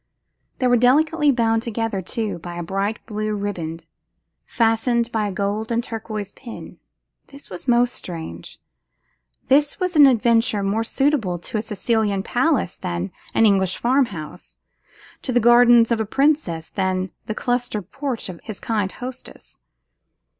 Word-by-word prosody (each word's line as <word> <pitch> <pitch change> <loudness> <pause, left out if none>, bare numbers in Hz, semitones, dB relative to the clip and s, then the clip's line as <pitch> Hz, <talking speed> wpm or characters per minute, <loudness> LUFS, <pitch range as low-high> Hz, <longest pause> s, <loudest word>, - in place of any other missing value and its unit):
They 255 - -1
were 245 -1 +4
delicately 295 +5 +4
bound 225 -3 +1
together, 225 -3 -2
too, 215 -1 -3
by 175 +1 -8
a 175 - -4
bright 195 +5 -2
blue 215 -2 -3
riband, 170 -5 -4 0.6
fastened 235 +1 +1
by 215 -2 0
a - - -3
gold 205 +3 -2
and 235 +1 +1
turquoise 215 -3 -5
pin. 235 0 -11 0.5
This 280 -5 -14
was 180 +8 -8
most 245 0 +3
strange; 165 -3 -8 0.9
this 290 +5 +3
was 365 -2 -1
an 290 -2 +9
adventure 230 -4 +2
more 205 +3 0
suitable 240 -7 0
to 195 +5 -4
a - - -1
Sicilian 210 -2 -1
palace 260 - 0
than 85 +2 -4 0.2
an 225 - +5
English 190 -3 +2
farm 260 +2 +2
house; 170 -2 -9 0.6
to 260 - -3
the 245 - +3
gardens 240 0 +6
of 230 -1 +2
a - - -1
princess 270 - 0
than 185 -1 -1 0.2
the 215 - -3
clustered 240 -6 -2
porch 275 -4 -3
of 180 -3 -8
his 215 -3 -7
kind 210 -4 -1
hostess. 255 +1 -10
225 Hz, 150 wpm, -22 LUFS, 195-245 Hz, 0.9 s, an